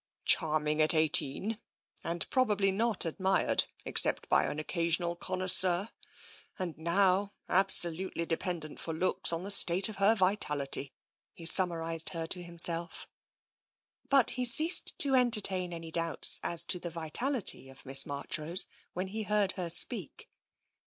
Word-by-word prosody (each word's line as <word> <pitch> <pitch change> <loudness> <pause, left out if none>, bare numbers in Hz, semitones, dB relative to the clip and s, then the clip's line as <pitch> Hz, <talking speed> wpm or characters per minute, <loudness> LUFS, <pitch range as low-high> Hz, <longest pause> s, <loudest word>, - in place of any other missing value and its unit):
Charming 155 0 +1
at 155 +2 +4
eighteen 160 +7 +1 0.2
— - - -27
and 170 0 -4
probably 210 -7 -1
not 215 0 -1
ad 165 - -8
mired, 190 0 0 0.2
except - - +3
by - - +1
an - - -6
occasional 170 +2 -4
connoisseur 185 +2 -1 0.3
— - - -23
and 180 -4 -7
now 190 +4 -1
absolutely 180 -2 +1
dependent 165 -2 -6
for 165 - -7
looks 180 +1 0
on 165 +1 -5
the 200 - -3
state 190 0 +2
of 210 - -11
her 200 +3 +1
vitality," 150 -9 -3 0.4
he 165 - -10
summarised 165 -2 +4
her 165 -1 -4
to 180 +2 -4
himself. 170 0 -5 1.0
But 275 -4 +1
he 250 +1 -5
ceased 310 +9 +4
to 285 -7 0
entertain 210 -8 +2
any 165 -1 -10
doubts 165 -1 +4
as 170 -1 +3
to 180 - -3
the 175 - -8
vital 170 - -5
ity 185 - +1
of 135 - -16
Miss 135 +1 +5
Marchrose 155 +5 +1 0.3
when 185 +2 -6
he 220 +3 -6
heard 210 -2 -1
her 180 -3 -7
speak. 185 - 0
175 Hz, 150 wpm, -28 LUFS, 165-200 Hz, 1.0 s, Miss